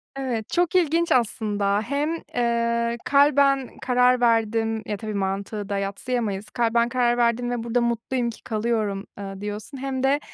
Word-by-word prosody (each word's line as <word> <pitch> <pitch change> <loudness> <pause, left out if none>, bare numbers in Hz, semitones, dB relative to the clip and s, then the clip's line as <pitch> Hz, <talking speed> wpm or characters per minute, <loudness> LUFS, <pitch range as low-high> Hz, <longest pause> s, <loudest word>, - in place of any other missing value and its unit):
Evet, 250 -5 -3
çok 350 0 +1
ilginç 335 -1 +2
aslında. 205 -4 +1
Hem, 280 +7 -1 0.3
ııı, 235 0 +1
kalben 280 -2 +4
karar 250 0 +3
verdim 225 -1 +1
Ya, 210 - -3
tabii, 215 +1 -5
mantığı 200 +1 -3
da 200 - -1
yadsıyamayız. 200 +1 -3
Kalben 235 0 +1
karar 240 -1 +2
verdim 240 0 +1
ve 240 -2 -2
burada 235 +1 0
mutluyum 235 +1 -1
ki 230 - -10
kalıyorum, 215 -3 -1
ııı, 195 -1 -7
diyorsun 210 +6 -6
hem 265 -1 -3
de, 275 +2 +3
235 Hz, 150 wpm, -24 LUFS, 215-255 Hz, 0.3 s, kalben